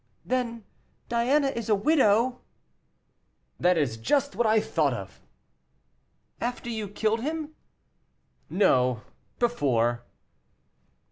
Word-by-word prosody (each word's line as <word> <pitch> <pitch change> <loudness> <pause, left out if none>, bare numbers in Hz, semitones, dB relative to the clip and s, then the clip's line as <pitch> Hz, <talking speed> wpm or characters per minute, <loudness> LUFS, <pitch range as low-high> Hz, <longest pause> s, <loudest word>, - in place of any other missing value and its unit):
"Then 235 -3 -2 0.5
Diana 265 +5 +2
is 235 -4 -5
a 210 - +5
widow." 250 -1 +2 1.2
"That 180 0 +3
is 130 -8 0
just 280 - 0
what 235 - +2
I 220 0 +4
thought 150 -10 0
of." 95 -4 -9 1.2
"After 240 0 -3
you 220 -2 -3
killed 215 +3 -1
him?" 310 +2 -4 1.0
"No, 125 - +2 0.3
before." 120 - +1
225 Hz, 95 wpm, -27 LUFS, 150-250 Hz, 1.2 s, a